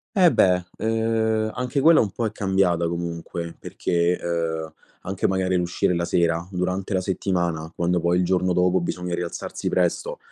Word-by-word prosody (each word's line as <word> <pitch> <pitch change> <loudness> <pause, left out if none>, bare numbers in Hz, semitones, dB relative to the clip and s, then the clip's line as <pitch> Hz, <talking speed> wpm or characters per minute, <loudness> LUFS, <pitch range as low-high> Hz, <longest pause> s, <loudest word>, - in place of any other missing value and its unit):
Eh 180 -4 +6
beh, 90 -1 +3
uhm, 110 -1 0
anche 125 +2 -1
quella 160 +2 +7
un 105 - 0
po' 115 +5 -3
è 110 - -1
cambiata 95 -4 +1
comunque 85 0 -5
perché, 85 +1 0
uhm, 80 -2 -2 0.3
anche 95 0 -1
magari 95 -1 0
l'uscire 90 0 +1
la 85 - -1
sera: 85 0 +1
durante 95 +2 -2
la 95 - +1
settimana, 85 -4 -1
quando 85 0 +1
poi 85 +1 +2
il 90 - +2
giorno 90 0 +1
dopo 90 +1 +3
bisogna 90 0 -3
rialzarsi 85 0 -4
presto, 90 -2 0
90 Hz, 165 wpm, -23 LUFS, 85-95 Hz, 0.3 s, quella